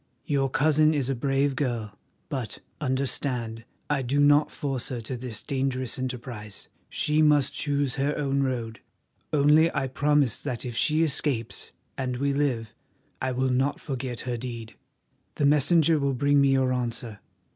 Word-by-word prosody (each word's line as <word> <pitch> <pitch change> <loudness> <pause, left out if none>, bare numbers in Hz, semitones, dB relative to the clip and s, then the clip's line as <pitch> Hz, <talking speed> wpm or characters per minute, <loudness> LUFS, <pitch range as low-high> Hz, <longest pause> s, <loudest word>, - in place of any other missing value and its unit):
Your 140 -3 +1
cousin 155 +3 +3
is 135 -2 0
a - - -1
brave 135 +2 +1
girl, 120 -6 -2 0.3
but, 130 -7 -4 0.2
understand, 130 -4 -1 0.2
I 145 -2 0
do 130 +3 0
not 145 +1 +5
force 135 -3 -3
her 125 -3 -3
to 120 +4 -5
this 120 -3 -6
dangerous 130 -2 -2
enterprise. 120 -5 -6 0.2
She 150 +1 +1
must 150 -3 +4
choose 145 -2 -1
her 140 +2 0
own 140 -1 0
road, 120 -4 -2 0.5
only 150 +3 +5
I 135 -1 +1
promise 145 -2 +1
that 125 -5 -4
if 120 -2 -5
she 155 +6 +2
escapes 140 -6 -2 0.3
and 125 -2 -2
we 140 +2 0
live 125 -6 -1 0.5
I 130 - 0
will 130 +1 0
not 135 +3 +1
forget 130 -4 -4
her 125 -1 -3
deed. 115 -2 -7 0.6
The 145 - +1
messenger 150 +2 +4
will 140 -1 0
bring 140 +2 +3
me 140 - +4
your 130 -1 +2
answer. 115 -3 -3
135 Hz, 155 wpm, -26 LUFS, 125-145 Hz, 0.6 s, not